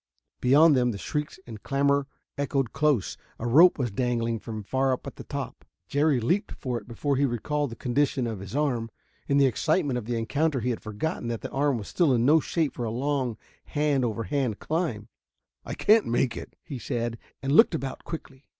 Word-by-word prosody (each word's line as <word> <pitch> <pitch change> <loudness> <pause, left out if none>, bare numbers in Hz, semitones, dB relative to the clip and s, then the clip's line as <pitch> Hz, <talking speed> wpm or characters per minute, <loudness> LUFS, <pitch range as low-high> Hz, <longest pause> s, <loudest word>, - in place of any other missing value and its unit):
Behind 145 +4 +6
them 125 -1 +3
the 110 - -3
shrieks 150 - -4
and 110 -3 -9
clamor 140 0 +1 0.3
echoed 140 -3 -1
close. 150 -9 +1 0.2
A 115 - -5
rope 160 +10 +6
was 125 -6 -1
dangling 115 0 -1
from 110 -2 -6
far 130 +5 +1
up 125 - -5
at - - -7
the - - -8
top. - - -6 0.2
Jerry 145 -2 +2
leaped 175 - 0
for 125 -3 -3
it - - -19
before 135 +3 -1
he 140 - +3
recalled 145 +4 -1
the 115 - -8
condition 130 +1 0
of 110 -4 -4
his 95 +5 -8
arm. 125 -6 0 0.4
In 140 - +2
the 140 - +6
excitement 140 - +1
of 110 - -9
the 120 0 -2
encounter 140 +4 0
he 125 +2 0
had 115 - -4
forgotten 110 +5 -3
that 115 -1 -3
the - - -6
arm 140 -1 +1
was 105 - -7
still 160 -8 +2
in 120 0 +2
no 155 +4 +6
shape 160 0 -1
for 120 - -5
a - - -2
long 130 -1 -1 0.3
hand 145 -3 +1
over 115 -1 -1
hand 135 -5 -1
climb. 155 - -2 0.6
"I - - -5
can't 220 0 +4
make 120 +1 +1
it," - - -8
he 140 -6 -6
said, 115 0 -3 0.2
and 135 - -1
looked 175 +3 +6
about 135 -4 -5
quickly. 140 -4 -8
130 Hz, 205 wpm, -27 LUFS, 115-145 Hz, 0.6 s, Behind